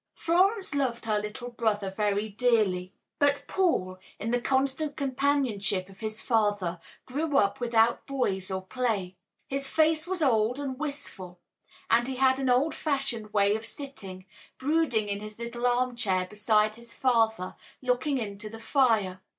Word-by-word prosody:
Florence 380 +3 +2
loved 255 -5 -1
her 215 -2 +1
little 210 +4 -6
brother 210 -4 0
very 205 +1 0
dearly, 205 -5 +1 0.3
but 285 0 +3
Paul, 185 - 0 0.2
in 225 +3 -3
the 245 0 +1
constant 275 +3 0
companionship 255 -9 0
of 190 -1 -16
his 215 0 -4
father, 205 -7 +1 0.3
grew 290 +2 -1
up 200 +2 +2
without 235 -1 +2
boys 200 -9 -1
or 190 0 -3
play. 205 -6 -1 0.3
His 275 0 -2
face 315 +1 +2
was 365 -3 -1
old 235 -2 +3
and 270 -2 -4
wistful, 250 -12 -6 0.5
and 240 +1 +3
he 265 - -3
had 260 +1 +3
an 265 -1 0
old 260 +6 +3
fashioned 270 -8 -2
way 205 0 +3
of 220 - -4
sitting, 200 -8 -8 0.3
brooding 270 -7 +1
in 200 0 -2
his 215 0 -8
little 235 +1 -2
arm 245 0 +1
chair 190 -6 0
beside 210 +2 +1
his 235 0 -11
father, 225 -7 +1 0.2
looking 255 +3 0
into 210 -2 -5
the 225 +1 -9
fire. 220 -8 +2
235 Hz, 155 wpm, -28 LUFS, 205-270 Hz, 0.5 s, but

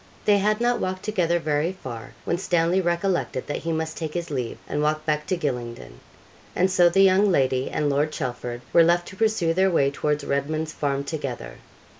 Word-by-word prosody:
They 205 -1 +5
had 210 +2 +1
not 240 +1 +1
walked 185 0 -3
together 180 -5 +1
very 155 +2 0
far, 120 - -8
when 170 - 0
Stanley 175 0 +2
recollected 175 -5 -1
that 145 - -3
he 165 - -3
must 160 0 -3
take 160 -1 -5
his 170 -2 -3
leave, 125 -4 -3
and 150 - -2
walk 155 +1 0
back 150 -1 -1
to 185 - 0
Gylingden; 120 - -4 0.6
and 185 +1 +2
so 175 -2 +5
the 195 +3 +4
young 195 +2 +5
lady 130 -4 +1
and 150 -1 -1
Lord 145 +2 +1
Chelford 125 -4 -4
were 170 - +7
left 175 +1 +2
to - - -11
pursue 215 -6 +1
their 190 +2 +3
way 140 -6 +2
towards 150 +1 -1
Redman's 155 +3 -2
Farm 140 -1 -1
together. 140 -4 -5
160 Hz, 195 wpm, -24 LUFS, 140-185 Hz, 0.6 s, were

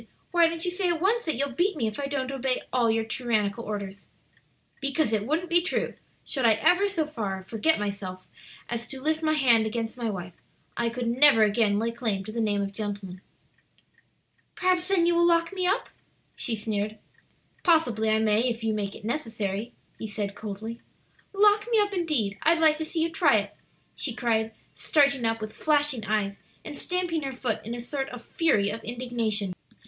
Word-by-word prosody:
Why 340 -1 +5
don't 330 +1 -4
you 355 - 0
say 360 0 0
at 340 -2 0
once 440 +7 +1
that 315 - 0
you'll 280 +3 -1
beat 350 +7 0
me 240 - 0
if 215 +2 -3
I 280 - -2
don't 275 -2 -2
obey 265 -1 -1
all 240 -3 +3
your 225 0 +1
tyrannical 225 -2 -1
orders?" 200 -2 -6 0.7
"Because 275 -3 0
it 210 0 0
wouldn't 330 +4 -1
be 345 0 +5
true; 365 - -1 0.3
should 265 - -1
I 230 -2 +6
ever 360 - +3
so 350 -6 -1
far 205 -10 -4
forget 225 +11 +1
myself 200 -3 -5 0.4
as 235 -1 -3
to 265 - -7
lift 310 +3 0
my 310 -1 +2
hand 235 -6 +4
against 225 +1 -3
my 235 -2 -2
wife, 180 -3 -5 0.4
I 235 -1 0
could 240 0 -3
never 245 -1 +6
again 210 -1 +2
lay 230 +2 0
claim 220 -5 -2
to 215 - -6
the 230 +1 -2
name 205 -2 +1
of 200 0 -5
gentleman." 200 -3 -5 1.3
"Perhaps, 365 -1 +1
then, 380 -3 +3
you 345 - +3
will 340 0 +3
lock 335 +1 +2
me 370 -2 0
up?" 390 +5 0 0.5
she 235 - -1
sneered. 215 0 -3 0.6
"Possibly 245 - +3
I 215 - +4
may, 220 +3 +2
if 230 -1 -4
you 220 -1 +1
make 205 -2 -3
it 215 - -11
necessary," 225 -4 -3 0.3
he 220 - -4
said 205 -1 -3
coldly. 220 +3 -7 0.5
"Lock 415 +1 +4
me 460 - +3
up, 410 -1 +2
indeed! 295 - 0
I'd 330 +2 +4
like 315 -1 +4
to 315 - -3
see 320 0 -1
you 330 - -1
try 315 - +4
it!" 205 0 -3 0.4
she 245 -6 -2
cried, 225 -2 0 0.2
starting 280 -5 +2
up 225 0 0
with 215 0 -6
flashing 295 -6 +2
eyes, 200 -1 -1 0.3
and 300 - -6
stamping 355 -1 -1
her 275 -2 -3
foot 235 -4 -2
in 230 +2 -5
a - - -6
sort 270 +3 -4
of 240 -1 -9
fury 210 -12 +2
of 225 - -6
indignation. 230 -5 -1
235 Hz, 195 wpm, -27 LUFS, 215-315 Hz, 1.3 s, I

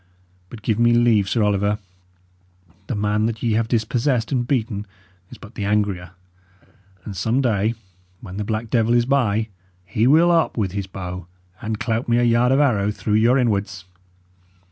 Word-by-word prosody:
But 110 -3 -11
give 110 -1 0
me 120 0 +4
leave, 115 -5 +3
Sir 115 - +1
Oliver: 105 0 +1 1.1
the 125 - -2
man 105 +1 0
that 115 -1 -5
ye 115 - +1
have 110 +1 +1
dispossessed 120 +2 0
and 125 -3 0
beaten 110 -6 -2 0.4
is - - -12
but 110 +1 -13
the 105 - -5
angrier, 100 -3 -1 0.9
and 100 - -6
some 110 +7 0
day, 110 -3 +1 0.4
when 95 -4 -9
the 105 - -2
black 110 +2 -3
devil 115 0 +2
is 120 -1 +3
by, 115 -5 +1 0.4
he 110 +6 +1
will 165 +5 +5
up 165 -5 +1
with 100 -5 0
his 100 0 -4
bow 90 -2 -7 0.3
and 110 -2 -3
clout 115 0 -2
me 120 - +3
a 120 - +2
yard 120 +1 +3
of 135 - +3
arrow 110 -9 +2
through 105 0 -3
your 115 +4 +4
inwards." 100 -6 -1
110 Hz, 175 wpm, -21 LUFS, 105-120 Hz, 1.1 s, will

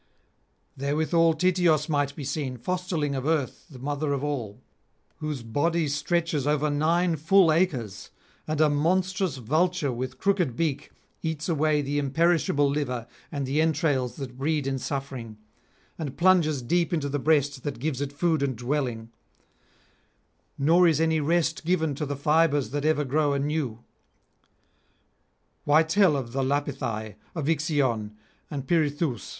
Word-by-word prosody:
Therewithal 160 +4 +2
Tityos 170 -3 +2
might 145 -3 0
be 150 - -6
seen, 140 -2 -3
fosterling 165 +1 -2
of 135 +2 -3
Earth 155 -6 -1
the 140 - -12
mother 145 +2 -2
of 140 0 -2
all, 125 -9 -3 0.6
whose 150 -5 -4
body 155 +7 0
stretches 150 0 -1
over 150 0 +1
nine 165 +4 +2
full 165 +2 +4
acres, 125 - -1 0.4
and 155 -1 -2
a 155 - +5
monstrous 180 +2 0
vulture 155 +5 0
with 130 +2 -5
crooked 185 - +1
beak 155 -3 -2 0.3
eats 160 -2 -3
away 155 -3 +1
the 145 +1 -1
imperishable 145 0 +2
liver 135 -5 -2 0.3
and 140 -2 -3
the 140 +4 +1
entrails 145 -5 +1
that 130 -3 -8
breed 150 0 0
in 135 -1 -1
suffering, 130 -6 -5 0.6
and 145 -5 -5
plunges 170 -7 +3
deep 170 +8 +1
into 155 -5 0
the 145 +1 -2
breast 145 -2 +1
that 145 -2 -4
gives 140 +1 -2
it 140 -1 -2
food 160 +1 0
and 135 -2 0
dwelling; 120 -2 -3 1.5
nor 170 +5 +5
is 160 -3 +2
any 160 -1 +2
rest 165 +3 0
given 160 -3 +1
to 150 +2 -4
the 145 -1 -3
fibres 145 -4 +2
that 145 +1 -2
ever 155 -1 +2
grow 145 +2 +1
anew. 140 -5 -2 1.8
Why 155 +2 +5
tell 165 0 +3
of 120 -4 -5
the 135 - 0
Lapithae, 130 -6 -2 0.2
of 155 -4 -3
Ixion 140 - 0 0.3
and 140 -3 -5
Pirithoüs? 145 - 0
145 Hz, 145 wpm, -26 LUFS, 135-160 Hz, 1.8 s, a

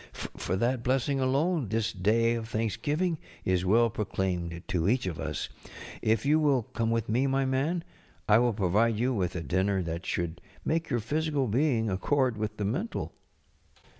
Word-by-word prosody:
For 90 - -4
that 120 +5 +1
blessing 135 +2 +1
alone 140 +2 +1
this 110 +1 0
day 115 +4 +2
of 115 -1 -4
thanks┬¼ 110 -1 -2
giving 160 +2 0 0.3
is 90 -1 +2
well 115 +4 +4
proclaimed 90 -5 -2
to 90 +1 +1
each 125 0 +2
of 85 -5 -3
us. 75 -1 -3 0.5
If 110 +2 +1
you 150 +2 +4
will 140 -5 +3
come 115 +1 -2
with 115 -1 0
me, 125 +6 +2
my 135 0 +1
man, 145 +6 0 0.4
I 105 +1 +6
will 120 -1 +2
provide 105 +3 +2
you 125 +4 +1
with 95 -5 -1
a 85 - -2
dinner 95 +5 +1
that 85 +1 -5
should 85 -2 -2 0.2
make 165 +1 0
your 120 -4 0
physical 150 +3 0
being 120 0 +2
accord 125 +6 +1
with 105 0 -3
the 105 - -1
mental. 170 - -2
115 Hz, 175 wpm, -29 LUFS, 95-135 Hz, 0.5 s, I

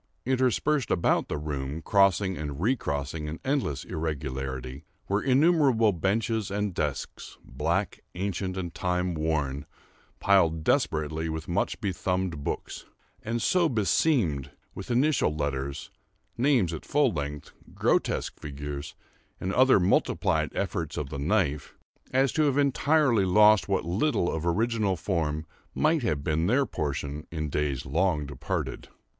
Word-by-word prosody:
Interspersed 130 +3 +1
about 85 - +2
the - - -2
room, 75 0 -4
crossing 95 -1 +3
and 75 -3 -5
recrossing 75 - -1
in 80 +2 -5
endless 130 - -1
irregularity, 65 -4 -4 0.2
were 100 +1 +1
innumerable 135 - +4
benches 105 +4 0
and 100 -1 -2
desks, 75 -5 -4
black, 85 +9 -1 0.2
ancient, 95 0 -3
and 85 -3 -4
time 90 0 -1
worn, 75 -3 -1 0.6
piled 85 -5 +3
desperately 80 +1 0
with 80 0 -5
much 85 - -1
bethumbed 90 -5 -2
books, - - -4 0.4
and 115 +1 -2
so 175 +6 +3
beseamed 105 - +1 0.2
with 95 - -8
initial 125 - +2
letters, 70 -2 -3 0.4
names 120 - +2
at 80 - -6
full 145 0 +2
length, 75 -1 -5 0.2
grotesque - - 0
figures, 75 0 -6 0.4
and 95 +1 -2
other 130 -2 +5
multiplied 90 +2 +1
efforts - - -2
of 70 -2 -3
the 70 - -4
knife, 70 +1 0 0.4
as 135 +1 +3
to 155 - +2
have 140 -1 +1
entirely 140 -4 +3
lost 105 +2 +5
what 95 - 0
little 90 - +1
of 80 +1 -2
original 110 +1 +1
form 80 -3 -2 0.3
might 155 0 +2
have 75 - -1
been 80 +1 0
their 130 +6 +3
portion 75 - -4
in 75 -2 -3
days 70 -2 -1
long 80 +2 +1
departed. 70 -2 -4
90 Hz, 130 wpm, -27 LUFS, 75-115 Hz, 0.6 s, other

